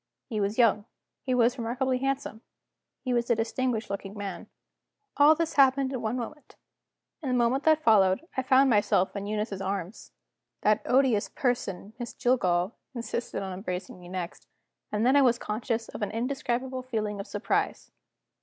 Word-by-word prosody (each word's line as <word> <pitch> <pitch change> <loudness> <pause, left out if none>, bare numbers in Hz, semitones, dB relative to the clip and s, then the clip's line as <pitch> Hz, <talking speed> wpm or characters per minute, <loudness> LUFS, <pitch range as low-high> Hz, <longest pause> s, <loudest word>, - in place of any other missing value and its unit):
He 215 -4 -3
was 200 +2 -1
young, 215 -4 +4 0.4
he 255 -2 -1
was 245 +1 +3
remarkably 250 +2 0
handsome, 270 -4 -2 0.6
he 255 - -1
was 240 0 0
a 235 - +4
distinguished 230 +1 -1
looking 200 0 -5
man. 200 -1 -6 0.7
All 295 +2 +7
this 330 0 -1
happened 270 0 +4
in 255 - -3
one 225 +2 -1
moment. 255 +3 -7 0.7
In 280 - -3
the 250 - +1
moment 245 +3 +2
that 315 0 +4
followed, 205 - +4
I 260 - +1
found 260 +1 +5
myself 205 -5 +2
in 200 0 -4
Eunice's 210 -2 -2
arms. 195 +1 -4 0.5
That 215 0 +3
odious 250 -5 +3
person, 215 -5 -2
Miss 240 -1 -6
Jillgall, 185 -7 +2 0.2
insisted 235 -2 -3
on 190 -1 -4
embracing 180 -1 -5
me 175 0 -12
next. 175 -10 -6 0.4
And 210 +2 0
then 260 +3 +5
I 285 - +7
was 245 -3 +4
conscious 225 +1 -3
of - - -8
an 205 - -1
indescribable 255 +1 -2
feeling 215 -5 -3
of 200 - -6
surprise. - - -2
235 Hz, 165 wpm, -28 LUFS, 205-260 Hz, 0.7 s, All